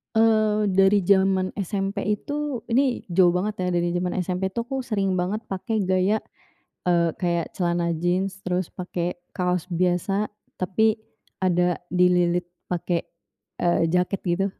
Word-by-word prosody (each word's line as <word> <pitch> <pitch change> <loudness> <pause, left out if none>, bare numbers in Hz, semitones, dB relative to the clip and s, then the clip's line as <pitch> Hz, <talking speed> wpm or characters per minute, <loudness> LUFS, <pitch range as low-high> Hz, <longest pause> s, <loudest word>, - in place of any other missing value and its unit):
Eee, 215 -1 +3
dari 195 +1 +4
jaman 190 -1 +3
SMP 200 0 -2 0.2
itu, 290 -3 -3
ini 255 +1 +2
jauh 180 -1 +4
banget 195 +4 -1
ya - - 0
dari 175 0 0
jaman 180 0 0
SMP 185 +1 -1
tuh 235 +4 -3
aku 265 0 -3
sering 200 -5 0
banget 185 +4 -1
pakai 215 +4 -2
gaya, 190 +3 +2 0.6
eee, 170 -2 +2
kayak 170 -2 -2
celana 170 -1 0
jeans, 185 +4 -1
terus 180 0 -1
pakai 180 -1 -3 0.2
kaos 180 -1 -1
biasa 180 +4 +1 0.3
tapi 220 +4 +2 0.4
ada 180 -2 +2 0.2
dililit 180 -1 +3 0.2
pakai, 175 -1 -2 0.6
eee, 175 -1 +3
jaket 180 +3 0
gitu 180 +3 +1
185 Hz, 135 wpm, -24 LUFS, 175-200 Hz, 0.6 s, dari